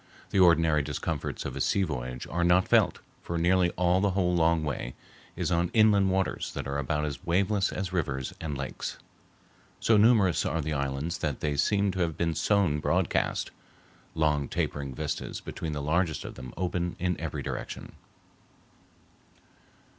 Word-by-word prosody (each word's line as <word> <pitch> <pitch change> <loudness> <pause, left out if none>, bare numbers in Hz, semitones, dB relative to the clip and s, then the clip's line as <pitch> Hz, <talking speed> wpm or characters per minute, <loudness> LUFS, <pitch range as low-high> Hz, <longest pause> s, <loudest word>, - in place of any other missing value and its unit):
The 100 - +2
ordinary 80 -4 +5
discomforts 70 -1 -3
of - - -4
a - - -3
sea 100 - +2
voyage 65 -6 -4
are 85 +2 -1
not 90 +2 +4
felt, - - +3 0.2
for 85 - -4
nearly 90 +1 +3
all 90 +1 +3
the 100 - +3
whole 90 -2 +1
long 85 -1 +3
way 65 -4 -4 0.4
is - - -2
on 85 0 +2
inland 105 -3 +5
waters 95 0 -1
that - - -4
are 70 0 -2
about 75 +2 -1
as 75 +3 -5
waveless 95 +3 +1
as 95 0 -4
rivers 70 -7 -2
and 75 -4 -3
lakes. 65 -2 -5 0.8
So 115 - +4
numerous 105 -5 +4
are 80 - -1
the 80 0 -2
islands 70 +5 -2
that 75 -5 -2
they 75 -1 0
seem 100 +7 +2
to 95 - -5
have 85 -3 0
been 85 -1 0
sown 85 -2 +2
broadcast; - - 0 0.6
long 75 -3 +1
tapering 70 -3 -3
vistas 75 +1 -4
between 80 -2 -5
the 75 -1 -3
largest 80 +2 0
of - - -6
them 65 -1 -9
open 90 -1 -1
in 90 0 0
every - - -4
direction. - - -5
85 Hz, 165 wpm, -28 LUFS, 75-95 Hz, 0.8 s, ordinary